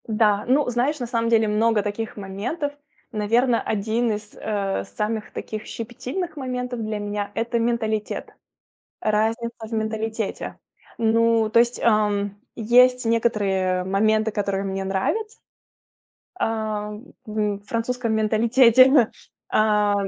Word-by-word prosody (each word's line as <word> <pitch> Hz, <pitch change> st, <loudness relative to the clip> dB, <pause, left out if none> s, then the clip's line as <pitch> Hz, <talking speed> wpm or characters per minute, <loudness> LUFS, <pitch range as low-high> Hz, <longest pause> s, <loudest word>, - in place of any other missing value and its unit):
Да, 210 Hz, -2 st, +2 dB
ну, 275 Hz, +3 st, +3 dB
знаешь, 255 Hz, +5 st, 0 dB
на 245 Hz, -, -2 dB
самом 230 Hz, -1 st, 0 dB
деле 225 Hz, -1 st, +4 dB
много 215 Hz, 0 st, +2 dB
таких 215 Hz, +2 st, -4 dB
моментов. 215 Hz, -, -4 dB, 0.4 s
Наверно, 230 Hz, +3 st, +2 dB
1 220 Hz, +3 st, 0 dB
из, 210 Hz, 0 st, -5 dB
э, 200 Hz, -3 st, -2 dB
самых 215 Hz, +1 st, -3 dB
таких 215 Hz, 0 st, -6 dB
щепетильных 260 Hz, -, -5 dB
моментов 250 Hz, -2 st, -3 dB
для 215 Hz, -1 st, -3 dB
меня- 205 Hz, 0 st, -3 dB
это 235 Hz, +1 st, 0 dB
менталитет. 225 Hz, -2 st, -2 dB, 0.7 s
Разница 225 Hz, +2 st, -1 dB
в -, -, -15 dB
менталитете. 220 Hz, -1 st, -3 dB, 0.4 s
Ну, 230 Hz, -1 st, +3 dB
то 230 Hz, -, +4 dB
есть, 240 Hz, +1 st, +2 dB
ам, 205 Hz, -2 st, +1 dB, 0.2 s
есть 250 Hz, +2 st, +4 dB
некоторые 195 Hz, -5 st, +1 dB
моменты, 215 Hz, +3 st, +2 dB
которые 200 Hz, -2 st, -1 dB
мне 195 Hz, 0 st, -3 dB
нравятся, 415 Hz, -, -2 dB, 1.0 s
ам, 215 Hz, -, -3 dB, 0.2 s
во 210 Hz, -2 st, -1 dB
французском 230 Hz, +3 st, -2 dB
менталитете. 235 Hz, +3 st, +5 dB, 0.4 s
А, 210 Hz, -1 st, +3 dB
220 Hz, 115 wpm, -23 LUFS, 210-235 Hz, 1.0 s, менталитете